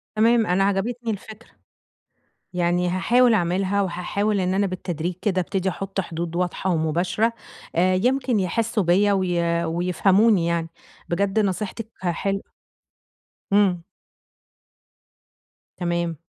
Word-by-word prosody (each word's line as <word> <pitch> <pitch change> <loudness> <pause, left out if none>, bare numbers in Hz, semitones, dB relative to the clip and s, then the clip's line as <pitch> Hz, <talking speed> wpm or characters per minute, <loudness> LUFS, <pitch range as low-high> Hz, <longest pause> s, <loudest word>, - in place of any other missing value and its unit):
تمام، 225 +1 +4
أنا 180 +2 +2
عجبِتني 225 +4 -1
الفكرة. 215 +2 -9 1.0
يعني 175 0 +1
هاحاول 235 +6 +3
اعملها 190 +1 +1
وهاحاول 200 +3 -1
إن 185 0 0
أنا 200 +1 +1
بالتدريج 180 -2 -3
كده 190 -3 +1
ابتدي 190 +1 -1
أحط 195 +1 -3
حدود 170 -1 -5
واضحة 180 +1 -1
ومباشرة، 175 +7 +1 0.4
آآ 185 +2 +3
يمكن 250 +2 +1
يحِسوا 210 +3 0
بيّا 195 +4 +3
وي 170 -3 0
ويفهموني 180 +3 +3
يعني. 165 -1 -1 0.4
بجد 195 +4 +1
نصيحتِك 210 +2 -2
حلوة. 195 +2 -2 1.0
امم. 195 -4 +3 1.9
تمام. 170 -2 -1
190 Hz, 105 wpm, -23 LUFS, 175-205 Hz, 1.9 s, تمام